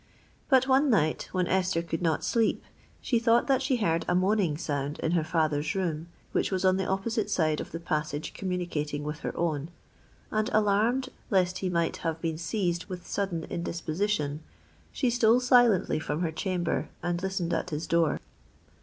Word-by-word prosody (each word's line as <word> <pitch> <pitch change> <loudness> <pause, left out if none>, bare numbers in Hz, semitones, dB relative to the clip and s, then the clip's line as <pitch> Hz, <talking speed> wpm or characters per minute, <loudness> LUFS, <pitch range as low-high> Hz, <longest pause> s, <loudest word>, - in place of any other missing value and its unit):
But 260 -2 +5
one 270 +2 +4
night, 155 -10 +1
when 185 -1 +1
Esther 185 -2 +1
could 165 0 -3
not 160 -3 +1
sleep, 230 -2 +1 0.4
she 240 - +1
thought 230 +1 +3
that 270 -2 +2
she 270 - +1
heard 170 -8 +1
a 175 - +2
moaning 185 -4 +2
sound 145 -2 -3
in 160 - -1
her 170 -2 +2
father's 155 -1 0
room, 170 -4 -2 0.2
which - - 0
was 190 0 0
on 185 0 +4
the 190 - -1
opposite 210 +2 -1
side 155 -6 +1
of - - -8
the 165 - -5
passage 155 -3 -3
communicating 170 -6 -3
with 150 +1 -4
her - - -5
own; 160 -3 -1 0.6
and, 215 0 0
alarmed 215 +5 +2 0.2
lest 185 -3 +2
he 185 - -1
might 170 -2 0
have 165 -1 -3
been 160 -1 -2
seized 175 0 -1
with 180 -3 -7
sudden 185 -5 -2
indisposition, 170 -2 -2 0.5
she 255 -3 0
stole 235 0 +4
silently 245 -9 +4
from 155 +1 -3
her 165 -3 0
chamber 175 0 -1
and 175 0 -1
listened 190 -2 -1
at - - -1
his 155 0 -3
door. 165 -1 +2
180 Hz, 175 wpm, -28 LUFS, 160-205 Hz, 0.6 s, But